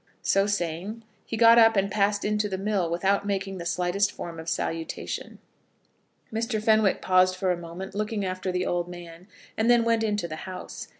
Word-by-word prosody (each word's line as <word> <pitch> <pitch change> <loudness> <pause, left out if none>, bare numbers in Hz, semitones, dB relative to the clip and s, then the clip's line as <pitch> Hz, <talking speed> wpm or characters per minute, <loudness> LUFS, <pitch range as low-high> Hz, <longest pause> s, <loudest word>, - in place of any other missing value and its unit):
So 195 +1 +3
saying, 200 +3 -3 0.2
he 225 - -3
got 230 0 +7
up 225 -1 +6
and 200 0 +1
passed 205 0 +1
into 210 0 0
the 190 - -3
mill 195 -3 0
without 190 +4 +1
making 195 -1 -3
the 170 - -4
slightest 180 +3 +1
form 165 -1 -7
of 160 +1 -5
salutation. 165 0 -4 1.0
Mr. 225 0 -1
Fenwick 215 -2 +3
paused 185 0 +4
for 185 0 0
a - - +1
minute, 175 +3 -8
looking 210 0 -2
after 185 0 -3
the 180 0 -1
old 175 0 -1
man, 175 0 -11 0.3
and 220 +2 +1
then 240 -1 +5
went 230 -1 +2
into 210 -4 -1
the 155 -1 -6
house. 185 -1 -7
195 Hz, 185 wpm, -26 LUFS, 175-210 Hz, 1.0 s, got